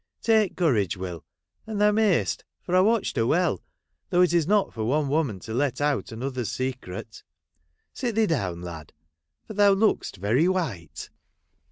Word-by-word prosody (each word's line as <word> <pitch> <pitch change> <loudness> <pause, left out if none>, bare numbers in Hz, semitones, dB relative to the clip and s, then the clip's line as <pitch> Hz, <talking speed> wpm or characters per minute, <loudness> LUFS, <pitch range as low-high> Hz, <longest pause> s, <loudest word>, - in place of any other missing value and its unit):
Take 220 -4 +3
courage, 115 - +1
Will; 90 -3 -6 0.4
and 215 -2 -4
thou 210 0 +5
mayst, 210 -4 +1 0.2
for 180 - -1
I - - +6
watched 215 -4 +2
her 115 -1 +2
well, 170 - +1 0.5
though 180 +1 +4
it 175 - +2
is 165 -3 +2
not 205 0 +2
for 110 - -4
one 140 +5 +1
woman 140 -8 0
to 110 - -7
let 135 +1 0
out 145 -3 0
another's 125 0 -4
secret. 130 -6 -5 0.7
Sit 240 -4 -3
thee 225 0 +4
down, 95 - -2
lad, 80 -4 -8 0.5
for - - -8
thou 205 -1 +5
look'st 205 - +1
very 115 - +2
white.' 140 - -3
145 Hz, 165 wpm, -25 LUFS, -, 0.7 s, I